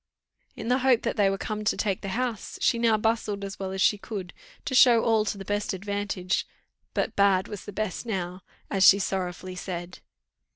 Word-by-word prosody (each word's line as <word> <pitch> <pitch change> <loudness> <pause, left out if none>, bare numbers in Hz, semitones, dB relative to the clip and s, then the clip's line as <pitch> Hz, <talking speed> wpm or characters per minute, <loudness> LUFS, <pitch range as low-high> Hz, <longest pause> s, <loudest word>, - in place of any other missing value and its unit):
In - - -6
the 250 +2 +2
hope 255 -3 +3
that 230 - -1
they 205 -3 +3
were 195 - -1
come 215 +1 -4
to 210 - +1
take 200 -3 -1
the 195 - -5
house, 245 -4 -3
she 235 - +2
now 230 -2 +3
bustled 215 -2 -1
as 195 -1 -6
well 190 -1 -3
as 190 0 0
she 210 - +3
could, 195 -4 -6 0.3
to - - -3
show 245 -3 +6
all 220 -2 +3
to 210 - -2
the 195 - -8
best 205 +1 -1
advantage, 195 -1 -2 0.5
but - - -1
bad 195 -2 +3
was 205 -3 -8
the - - -7
best 210 -2 -3
now, 185 -3 -3 0.3
as 195 -1 +2
she 195 - +9
sorrowfully 185 -1 -3
said. 180 -1 -6
200 Hz, 205 wpm, -26 LUFS, 190-220 Hz, 0.5 s, she